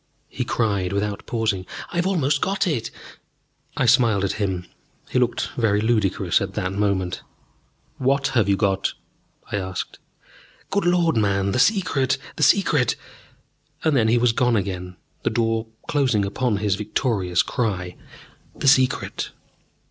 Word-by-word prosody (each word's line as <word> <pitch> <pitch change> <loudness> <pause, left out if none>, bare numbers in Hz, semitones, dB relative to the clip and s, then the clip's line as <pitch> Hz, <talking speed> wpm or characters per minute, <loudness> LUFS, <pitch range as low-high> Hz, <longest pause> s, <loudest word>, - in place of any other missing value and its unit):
he 125 - -3
cried, 100 -7 0
without 100 0 -2
pausing, 110 -5 -1 0.3
"I've 175 +1 +1
almost 145 -7 +1
got 195 +1 +1
it!" 145 -11 -1 0.9
I - - +2
smiled 115 -5 +4
at 100 - +1
him: 95 -3 -1 0.5
he - - +2
looked 125 -1 0
very 110 -4 +2
ludicrous 110 -3 +1
at - - -4
that 95 0 -2
moment. 100 -3 -1 0.8
"What 135 +1 +2
have 115 -7 +2
you 100 - +3
got?" 95 -2 0 0.6
I - - 0
asked. 95 -1 -5 0.7
"Good 200 -2 +1
Lord, 175 -5 +3
man, 100 -2 +1
the 125 - 0
Secret 145 - +2 0.2
the - - -6
Secret!" - - +3 0.9
And 160 -2 +2
then 115 -4 +3
he 115 +2 +4
was 120 0 +3
gone 125 +1 +2
again, 90 -3 -3 0.3
the - - 0
door 115 -1 0 0.2
closing 130 -8 +2
upon 105 +2 0
his 105 -1 0
victorious 100 -3 0
cry, 95 -7 -2 0.6
"The - - -2
Secret!" 130 -2 +2
110 Hz, 140 wpm, -23 LUFS, 100-130 Hz, 0.9 s, smiled